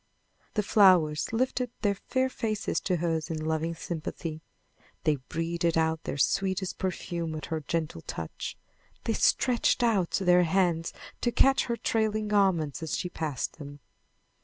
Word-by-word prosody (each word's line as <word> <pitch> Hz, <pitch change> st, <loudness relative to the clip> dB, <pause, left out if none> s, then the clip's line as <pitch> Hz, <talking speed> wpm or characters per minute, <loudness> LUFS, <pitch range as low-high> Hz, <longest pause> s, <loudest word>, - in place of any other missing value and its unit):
The 210 Hz, -, +2 dB
flowers 180 Hz, -8 st, +4 dB
lifted 250 Hz, +1 st, 0 dB
their 205 Hz, -1 st, +3 dB
fair 260 Hz, +6 st, -1 dB
faces 220 Hz, -5 st, -2 dB
to 185 Hz, -, 0 dB
hers 165 Hz, -1 st, -1 dB
in 155 Hz, -1 st, -3 dB
loving 160 Hz, +1 st, -1 dB
sympathy. 160 Hz, -1 st, -5 dB, 0.6 s
They 155 Hz, -2 st, +2 dB
breathed 170 Hz, 0 st, 0 dB
out 160 Hz, 0 st, +1 dB
their -, -, -3 dB
sweetest 190 Hz, +4 st, 0 dB
perfume 170 Hz, -3 st, -3 dB
at 155 Hz, -, -5 dB
her 160 Hz, -, 0 dB
gentle 155 Hz, -, -3 dB
touch. 80 Hz, 0 st, -6 dB, 0.5 s
They 225 Hz, -, 0 dB
stretched 240 Hz, +2 st, +2 dB
out 205 Hz, -7 st, +2 dB
their 180 Hz, -2 st, +4 dB
hands 170 Hz, -1 st, +1 dB, 0.3 s
to 240 Hz, -, +1 dB
catch 270 Hz, +3 st, +4 dB
her 235 Hz, -1 st, -2 dB
trailing 215 Hz, -2 st, 0 dB
garments 180 Hz, -8 st, +2 dB
as 160 Hz, -, -2 dB
she 180 Hz, -, -3 dB
passed 155 Hz, -3 st, -4 dB
them. 145 Hz, -1 st, -9 dB
175 Hz, 145 wpm, -28 LUFS, 160-210 Hz, 0.6 s, flowers